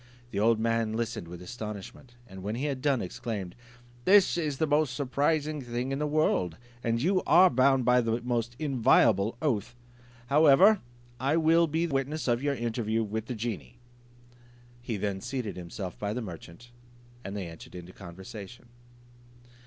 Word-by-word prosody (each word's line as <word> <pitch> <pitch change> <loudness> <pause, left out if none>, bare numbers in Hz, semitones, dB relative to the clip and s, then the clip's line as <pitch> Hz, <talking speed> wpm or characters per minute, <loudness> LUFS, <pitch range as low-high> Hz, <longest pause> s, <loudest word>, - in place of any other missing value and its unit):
The 100 - -2
old 110 +1 +3
man 115 -1 0
listened 115 -6 -3
with 90 +1 -9
astonishment, 105 +4 -8
and 95 -4 -11
when 105 +4 -3
he 130 +5 -2
had 135 -3 -2
done, 140 -3 +1
exclaimed, 100 -2 -5 0.5
"This 200 0 +6
is 155 -5 -2
the 160 - +2
most 150 -3 +1
surprising 145 +2 0
thing 120 +1 -3
in 135 - -2
the 150 - 0
world! 120 - +1 0.3
and 115 0 0
you 185 +7 +2
are 180 +3 +7
bound 130 0 +3
by 125 0 +5
the 115 0 0
most 120 -1 -2
inviolable 115 -6 +3
oath. 120 -5 -1 0.5
However, 155 - +6 0.4
I 140 +5 +1
will 165 +1 +4
be 160 +3 0
witness 145 0 -2
of 120 0 +1
your 140 0 0
interview 115 -2 -1
with 110 +1 -4
the 125 - -4
genie." 105 - -5 1.0
He 120 -3 -3
then 95 -1 -2
seated 125 -5 -4
himself 90 +1 -7
by 105 0 -2
the 125 - -3
merchant, 90 +5 -10 0.5
and 100 +1 -5
they 95 - -4
entered 80 +1 -11
into 90 0 -9
conversation. 95 +6 -10
120 Hz, 160 wpm, -28 LUFS, 105-140 Hz, 1.0 s, are